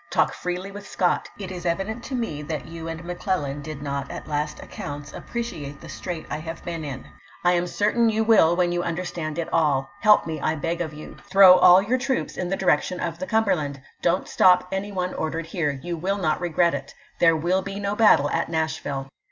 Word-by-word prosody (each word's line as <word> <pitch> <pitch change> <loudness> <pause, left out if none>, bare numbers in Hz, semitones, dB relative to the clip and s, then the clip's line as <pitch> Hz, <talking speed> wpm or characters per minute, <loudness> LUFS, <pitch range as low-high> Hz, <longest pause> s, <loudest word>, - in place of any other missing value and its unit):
Talk - - +2
freely 180 +2 -4
with 205 0 -9
Scott. 180 - 0
It 190 -2 -6
is 180 -1 -6
evident 195 +7 -2
to 270 - -4
me 225 -12 -3
that 155 0 -4
you 165 +1 -8
and 165 0 -5
Mc 175 0 -5
Clellan 145 -7 -1
did 145 -1 -7
not 140 -1 -3
at - - -7
last 150 0 -2
accounts 145 +1 -7
appreciate 160 -12 -5
the - - -11
strait 175 -4 -5
I - - -3
have 165 +2 -7
been 170 -2 -4
in. 140 -3 -6 0.4
I 175 - +5
am 175 0 +1
certain 225 +5 +2
you 220 0 +1
will 200 -7 +5
when 175 -1 +2
you 175 0 0
under 175 +1 -3
stand 155 -3 -4
it 170 - -2
all. 140 -4 +2
Help 210 -1 +5
me, 160 -2 -4
I 155 - +1
beg 165 +3 -2
of 160 -3 -2
you. 150 0 -10
Throw 190 -2 +8
aU 180 +2 +8
your 240 +6 0
troops 265 0 -1
in 180 - -3
the 195 - -1
direction 180 0 +1
of 170 -1 -3
the 185 - -4
Cumberland. 180 -11 +1 0.2
Don't 175 +2 +1
stop 180 0 +4
any 195 +2 -3
one 180 -2 -2
ordered 160 +1 -3
here. 150 -5 -2
You 175 -1 -3
wiU 195 +4 -1
not 160 -2 0
regret 170 0 +2
it. - - -6 0.2
There 165 -1 +5
will 175 +4 +1
be 195 +1 -6
no 200 0 -1
battle 210 -10 +5
at - - 0
Nashville. 155 -4 -2
175 Hz, 220 wpm, -24 LUFS, 155-190 Hz, 0.4 s, Throw